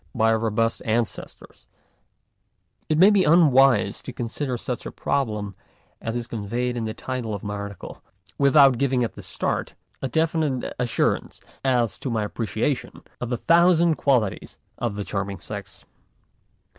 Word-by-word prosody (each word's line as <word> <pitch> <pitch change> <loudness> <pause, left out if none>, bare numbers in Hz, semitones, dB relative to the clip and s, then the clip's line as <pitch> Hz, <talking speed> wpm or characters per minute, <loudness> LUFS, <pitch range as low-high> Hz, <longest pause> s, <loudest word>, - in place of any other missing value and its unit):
by 115 -1 +3
our 110 - +2
robust 115 +1 0
ancestors, 115 0 -4 1.2
it 155 - +2
may 190 +5 +7
be 200 -2 +4
unwise 135 - +4
to - - -7
con 120 -1 -4
sider 125 +1 -3
such 120 +1 -5
a - - -6
problem 105 -8 -2 0.5
as 115 +1 -3
is 120 -1 -2
conveyed 120 +2 -3
in 115 -2 -2
the 110 - -3
title 125 -5 -4
of 100 - -8
my 105 -1 -4
article 100 -2 -7 0.4
without 140 -3 +6
giving 130 -2 +2
at 115 - -3
the - - -10
start - - -3 0.3
a 135 - -1
definite 155 -2 0
assurance 125 -2 0 0.2
as 125 -4 +1
to 135 - -4
my 110 -3 0
appreciation 115 +5 -3 0.2
of 125 - -4
the 120 - -1
thousand 170 +2 +4
qualities 125 -10 0 0.2
of 120 -4 -2
the 105 - -3
charming 100 +1 -3
sex. - - -9
120 Hz, 155 wpm, -24 LUFS, 110-140 Hz, 1.2 s, may